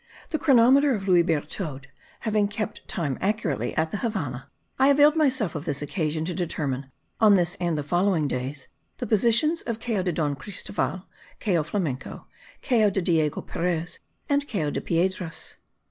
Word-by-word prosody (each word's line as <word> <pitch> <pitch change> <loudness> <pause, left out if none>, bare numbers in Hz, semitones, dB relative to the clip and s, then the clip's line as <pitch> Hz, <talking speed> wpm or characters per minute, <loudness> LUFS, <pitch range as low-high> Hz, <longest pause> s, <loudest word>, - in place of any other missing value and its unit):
The 310 - 0
chronometer 270 0 +5
of 200 -2 -5
Louis 180 -2 +6
Berthoud 155 -3 -2 0.4
having 215 -2 +1
kept 210 0 -5
time 145 -7 -2
accurately 165 - -1
at 160 0 +1
the 210 - -2
Havannah, 155 - -3 0.3
I 265 - +5
availed 290 +2 +6
myself 260 - +2
of 150 0 -5
this 145 -2 0
occasion 155 +1 -2
to 180 - -2
determine, 140 -7 -3 0.3
on 215 -2 +6
this 175 -2 +2
and 170 -3 0
the 150 - -2
following 175 0 +1
days, 130 +1 -4 0.3
the - - -3
positions 235 - +3
of 230 -2 -4
Cayo 225 -4 -1
de 180 -1 0
Don 150 -3 -1
Cristoval, 185 +3 -3 0.3
Cayo 180 -7 +1
Flamenco, 150 -5 -4 0.4
Cayo 220 -5 +3
de 195 - -1
Diego 160 -4 +1
Perez 170 -1 -3 0.3
and 285 0 +1
Cayo 160 - -1
de - - -3
Piedras. 175 0 -2
180 Hz, 160 wpm, -25 LUFS, 155-220 Hz, 0.4 s, Louis